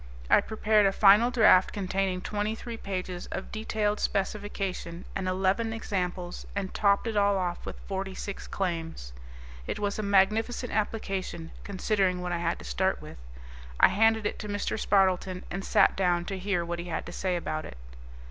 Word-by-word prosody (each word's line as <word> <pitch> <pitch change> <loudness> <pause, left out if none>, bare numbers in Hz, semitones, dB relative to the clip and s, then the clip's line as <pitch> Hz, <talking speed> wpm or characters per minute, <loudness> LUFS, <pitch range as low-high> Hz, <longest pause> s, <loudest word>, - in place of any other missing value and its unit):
I - - +7
prepared 215 -1 +2
a - - +2
final 210 +4 +6
draft 215 -6 +5
containing 190 -1 -1
twenty 210 +2 -2
three 235 +1 -7
pages 185 -4 -5
of 190 - -6
detailed 215 -1 -1
specification 195 -3 -3
and 190 -1 -2
eleven 195 +5 +1
examples 180 -5 -3
and 195 -2 -3
topped 200 +1 +3
it 225 -2 -2
all 200 -1 +3
off 175 -2 -3
with - - -6
forty 195 -1 -4
six 200 - -6
claims. 165 - -3 0.5
It - - -2
was 205 0 -2
a - - +1
magnificent 215 +5 +2
application, 195 -6 -2
considering 195 -2 0
what 180 0 -3
I 175 - -1
had 170 0 -1
to - - -11
start - - 0
with. - - -11 0.6
I - - +7
handed 225 +1 +3
it - - -2
to 210 - -5
Mr. 205 0 -2
Spardleton 185 -2 +2
and 195 +2 -3
sat - - +4
down 175 -2 +1
to 195 0 -4
hear 180 -3 0
what 170 0 -3
he 170 - -5
had 165 -3 -3
to - - -7
say 185 +1 -1
about 155 -2 -3
it. - - -10
195 Hz, 175 wpm, -28 LUFS, 180-210 Hz, 0.6 s, I